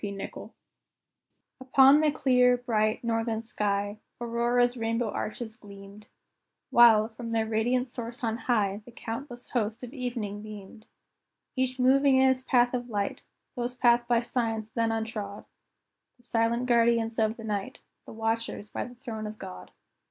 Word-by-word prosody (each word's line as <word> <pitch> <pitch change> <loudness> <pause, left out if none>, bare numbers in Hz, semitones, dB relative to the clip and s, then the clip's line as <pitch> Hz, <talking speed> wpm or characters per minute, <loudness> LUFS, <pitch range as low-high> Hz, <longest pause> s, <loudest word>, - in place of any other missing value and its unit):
P. 205 - -3
Nichol._ 195 -1 -7 1.1
Upon 265 +3 +6
the 310 - +4
clear, 250 -3 +3
bright, 220 -3 0
northern 225 -1 -1
sky, 205 -1 -2 0.2
Aurora's 240 +1 +1
rainbow 230 -1 -1
arches 220 0 -5
gleamed, 200 -1 -13 0.6
While, 225 -2 +7
from 230 +1 -8
their 225 -1 +1
radiant 240 +4 0
source 240 0 -7
on 225 -1 0
high, 205 -3 +1
The 240 - -13
countless 240 +2 -7
host 230 0 -1
of 250 +1 -8
evening 235 -6 -4
beamed; 215 0 -11 0.7
Each 260 -1 0
moving 270 +2 +4
in 265 0 +5
its 260 0 -1
path 245 -1 +3
of 245 0 -3
light 205 -3 -2 0.3
Those 245 0 -3
paths 240 -1 +3
by 240 0 +3
Science 225 -3 -2
then 230 0 0
untrod 220 -2 -4 0.7
The 245 - -27
silent 235 +1 0
guardians 230 -2 +2
of 220 0 +1
the 225 - -9
night, 205 -3 -3 0.3
The - - -9
watchers 225 -1 -3
by - - -3
the 245 - -11
throne 225 -3 -6
of 210 0 -8
God. 90 - -9
230 Hz, 150 wpm, -28 LUFS, 215-245 Hz, 1.1 s, While